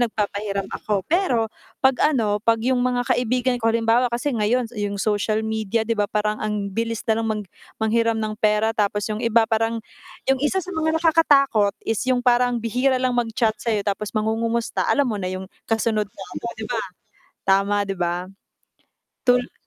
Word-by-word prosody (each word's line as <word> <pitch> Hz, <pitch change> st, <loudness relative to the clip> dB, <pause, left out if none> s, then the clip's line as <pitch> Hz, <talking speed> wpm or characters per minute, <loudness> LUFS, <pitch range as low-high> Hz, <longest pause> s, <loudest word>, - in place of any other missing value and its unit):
nagpapahiram 205 Hz, -3 st, -1 dB
ako 200 Hz, -3 st, -2 dB
pero 300 Hz, -, +1 dB, 0.3 s
'pag 265 Hz, -1 st, +4 dB, 0.2 s
ano 210 Hz, -4 st, +1 dB
'pag 230 Hz, 0 st, +3 dB
yung 255 Hz, -1 st, +2 dB
mga 245 Hz, 0 st, +1 dB
kaibigan 250 Hz, +1 st, +1 dB
ko, 225 Hz, -, +2 dB
halimbawa 230 Hz, +2 st, +2 dB
ko 235 Hz, -, -2 dB
kasi 285 Hz, +4 st, -2 dB
ngayon 230 Hz, +3 st, +1 dB
yung 205 Hz, -1 st, -2 dB
social 215 Hz, +1 st, 0 dB
media, 220 Hz, 0 st, -1 dB
'di 230 Hz, -, +1 dB
ba 205 Hz, -1 st, +1 dB
parang 210 Hz, 0 st, -1 dB
ang 210 Hz, -2 st, -2 dB
bilis 230 Hz, +2 st, -2 dB
nalang 225 Hz, 0 st, +1 dB
mag 215 Hz, -1 st, -1 dB, 0.4 s
manghiram 230 Hz, +1 st, +2 dB
ng 215 Hz, -1 st, -2 dB
pera 215 Hz, +1 st, +2 dB
tapos 205 Hz, -1 st, 0 dB
yung 215 Hz, 0 st, -3 dB
iba 230 Hz, -1 st, +4 dB
parang 225 Hz, 0 st, 0 dB, 0.5 s
yung 270 Hz, -1 st, +3 dB
isa 335 Hz, +6 st, +1 dB
sa 370 Hz, -, -7 dB
mga 320 Hz, 0 st, +1 dB
nakakatakot 275 Hz, -10 st, +4 dB
is 225 Hz, -1 st, -1 dB
yung 255 Hz, -1 st, +3 dB
parang 245 Hz, 0 st, +3 dB
bihira 250 Hz, +4 st, +1 dB
lang 255 Hz, -1 st, +1 dB
mag-chat 225 Hz, -1 st, +1 dB
sa'yo, 220 Hz, -3 st, -1 dB
tapos 200 Hz, +1 st, -2 dB
mangungumusta, 225 Hz, +2 st, 0 dB
alam 285 Hz, -2 st, +3 dB
mo 220 Hz, -, -1 dB
na 185 Hz, -, -2 dB
yung 185 Hz, 0 st, -5 dB, 0.2 s
kasunod 220 Hz, -2 st, +1 dB
'non, 195 Hz, -, -11 dB, 0.2 s
'di 220 Hz, -, -4 dB
ba? 230 Hz, -2 st, -1 dB, 0.7 s
Tama 200 Hz, +1 st, +3 dB
di 195 Hz, -, -2 dB
ba? 175 Hz, +1 st, -1 dB, 1.0 s
Tul 245 Hz, 0 st, +2 dB
225 Hz, 175 wpm, -22 LUFS, 210-245 Hz, 1.0 s, pag